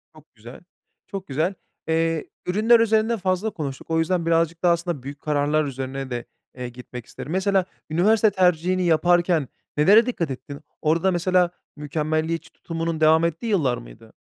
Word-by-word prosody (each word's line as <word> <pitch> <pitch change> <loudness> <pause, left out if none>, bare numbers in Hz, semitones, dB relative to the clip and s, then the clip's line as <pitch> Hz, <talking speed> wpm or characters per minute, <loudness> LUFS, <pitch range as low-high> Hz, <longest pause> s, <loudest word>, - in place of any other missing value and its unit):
Çok 155 -4 -20
güzel, 115 +3 -12 0.5
çok 195 -1 -6
güzel. 155 +7 0 0.3
Eee, 165 -1 0 0.2
ürünler 220 +6 +4
üzerinde 225 +1 +2
fazla 185 +2 0
konuştuk. 145 -9 -6
O 160 - +2
yüzden 170 +1 0
birazcık 165 0 +1
daha, 175 -1 +5
aslında, 170 -5 -3
büyük 140 +1 -8
kararlar 150 +1 +1
üzerine 135 0 -5
de, 120 -2 -4 0.3
eee, 125 -1 -5
gitmek 125 -1 -10
isterim. 150 - -9
Mesela, 190 0 +2 0.2
üniversite 210 +7 +4
tercihini 180 -1 +2
yaparken 175 -2 +3 0.3
nelere 205 +10 +6
dikkat 175 - -2
ettin? 140 +3 -8 0.2
Orada, 165 +4 +2
mesela, 180 0 +2 0.2
mükemmeliyetçi 155 +2 -2
tutumunun 165 -1 -4
devam 160 +1 +5
ettiği 170 +7 -3
yıllar 155 - +1
mıydı? - - -14
165 Hz, 150 wpm, -23 LUFS, 150-185 Hz, 0.5 s, nelere